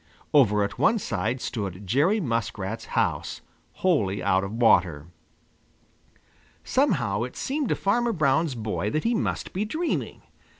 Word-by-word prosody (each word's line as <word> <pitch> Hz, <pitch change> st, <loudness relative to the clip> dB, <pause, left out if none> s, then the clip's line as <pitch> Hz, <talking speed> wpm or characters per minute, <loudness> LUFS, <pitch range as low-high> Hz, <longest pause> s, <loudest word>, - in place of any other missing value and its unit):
Over 105 Hz, -8 st, +5 dB
at 100 Hz, -, -4 dB
one 230 Hz, -, +4 dB
side 120 Hz, -, -2 dB
stood 100 Hz, -4 st, -4 dB
Jerry 150 Hz, -, +2 dB
Muskrat's 115 Hz, -, -3 dB
house, -, -, -1 dB, 0.4 s
wholly 100 Hz, -, +2 dB
out 95 Hz, -1 st, +2 dB
of 95 Hz, -, -4 dB
water. 90 Hz, -10 st, +3 dB, 1.6 s
Somehow, 140 Hz, -, +1 dB
it 125 Hz, +1 st, -4 dB
seemed 280 Hz, -2 st, -2 dB
to -, -, +2 dB
Farmer 235 Hz, +4 st, +1 dB
Brown's 155 Hz, -, +1 dB
boy 105 Hz, -2 st, -2 dB
that 155 Hz, +7 st, -1 dB
he 235 Hz, -, +1 dB
must 225 Hz, -, -2 dB
be 195 Hz, -, -1 dB
dreaming. 315 Hz, +11 st, -3 dB
120 Hz, 135 wpm, -25 LUFS, -, 1.6 s, Over